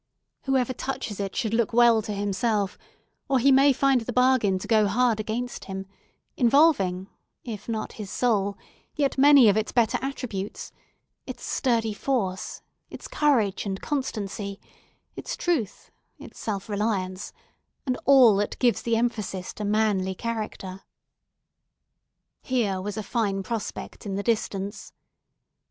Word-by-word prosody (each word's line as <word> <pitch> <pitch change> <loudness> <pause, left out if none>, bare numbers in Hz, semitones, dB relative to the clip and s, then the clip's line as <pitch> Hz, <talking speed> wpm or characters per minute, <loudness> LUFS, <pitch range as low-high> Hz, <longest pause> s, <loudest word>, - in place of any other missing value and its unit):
Whoever 260 -2 +1
touches 255 -6 -5
it 195 -1 -3
should 220 -2 -1
look 230 -1 +1
well 235 -1 +5
to 215 - -6
himself, 205 0 -1 0.5
or 270 - +3
he 270 +3 +4
may 275 +2 +6
find 270 -1 +2
the 225 - -4
bargain 250 -6 +3
to 185 - -7
go 215 -2 +4
hard 230 +1 +2
against 230 +3 -4
him, 190 0 -6 0.5
involving, 235 - +3 0.4
if 220 -2 -7
not 220 -1 -3
his 210 -3 -7
soul, 205 -5 0 0.4
yet 280 -3 0
many 280 -3 +8
of 200 - +5
its 220 - -1
better 235 -3 +2
attributes; 235 -7 -5 0.6
its - - -7
sturdy 230 -5 0
force, 205 -6 -2 0.3
its - - -9
courage 240 -10 +1
and 195 -1 -3
constancy, 205 -8 -4 0.6
its - - -5
truth, 295 - -2 0.3
its - - -12
self 200 -3 -4
reliance, 200 -3 -2 0.5
and 255 -2 0
all 260 -6 +7
that 205 +1 -2
gives 245 -2 +2
the 230 -1 0
emphasis 215 -5 -2
to 210 - -6
manly 205 -3 +1
character. 210 -4 -5 1.6
Here 215 -8 0
was 205 +2 -5
a 215 - -3
fine 200 -3 -1
prospect 220 0 -5
in 195 - -3
the 200 - -2
distance. 205 -3 -2
220 Hz, 140 wpm, -25 LUFS, 200-250 Hz, 1.6 s, many